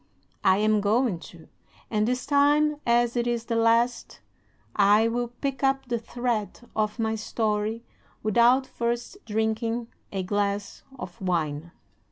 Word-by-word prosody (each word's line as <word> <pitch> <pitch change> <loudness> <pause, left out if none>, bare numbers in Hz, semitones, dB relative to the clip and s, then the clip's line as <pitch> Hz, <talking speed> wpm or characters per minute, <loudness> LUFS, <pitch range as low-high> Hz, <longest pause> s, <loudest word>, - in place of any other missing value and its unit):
"I 190 - +5
am 215 0 +2
going 210 -2 +1
to; 165 -2 -15 0.4
and 210 0 +1
this 250 +1 -1
time, 295 +1 +3
as 240 0 +3
it 240 0 0
is 235 -1 -1
the 230 - -2
last, 230 +2 +1 0.6
I 210 +2 +5
will 240 +1 -1
pick 265 +3 -5
up 270 0 +2
the 240 -2 -2
thread 235 -2 -3
of 215 0 0
my 220 -1 0
story 220 0 -1 0.4
without 235 +5 +4
first 240 +7 -3
drinking 225 +2 -1 0.2
a 195 -2 -2
glass 200 +1 -2 0.2
of 180 -6 -9
wine." 165 -3 -1
230 Hz, 140 wpm, -26 LUFS, 210-240 Hz, 0.6 s, I